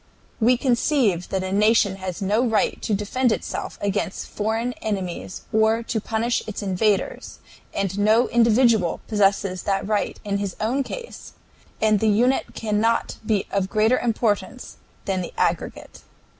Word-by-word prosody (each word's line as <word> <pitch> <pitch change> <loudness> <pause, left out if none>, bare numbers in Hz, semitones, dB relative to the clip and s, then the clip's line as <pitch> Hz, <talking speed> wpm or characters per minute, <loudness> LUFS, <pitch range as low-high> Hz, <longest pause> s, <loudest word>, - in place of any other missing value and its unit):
"We 245 +2 +4
conceive 240 - +1
that 190 -1 -1
a 190 - -4
nation 210 -1 +3
has 190 +1 -5
no 210 +5 +2
right 225 -4 +1
to 210 - 0
defend 235 +5 0
itself - - -4
against 200 -1 -2
foreign 225 +3 -2
enemies 190 -4 -4
or 220 +1 +3
to 225 -1 -2
punish 225 +3 0
its 215 0 -5
invaders, 205 - -1 0.3
and 195 0 -2
no 220 +4 +4
individual 230 -5 +3
possesses 195 -3 +1
that 195 -1 -1
right 210 -1 -1
in 200 -1 -1
his 200 -2 -3
own 245 +6 0
case, 480 - -8 0.5
and 215 -1 +3
the 220 - +2
unit 245 +6 +1
cannot 220 +1 0
be 210 -3 0
of 195 -1 0
greater 220 +3 +3
importance 225 -3 -1 0.3
than 190 -2 -1
the 175 - -7
aggregate. - - -2
215 Hz, 145 wpm, -23 LUFS, 200-230 Hz, 0.5 s, We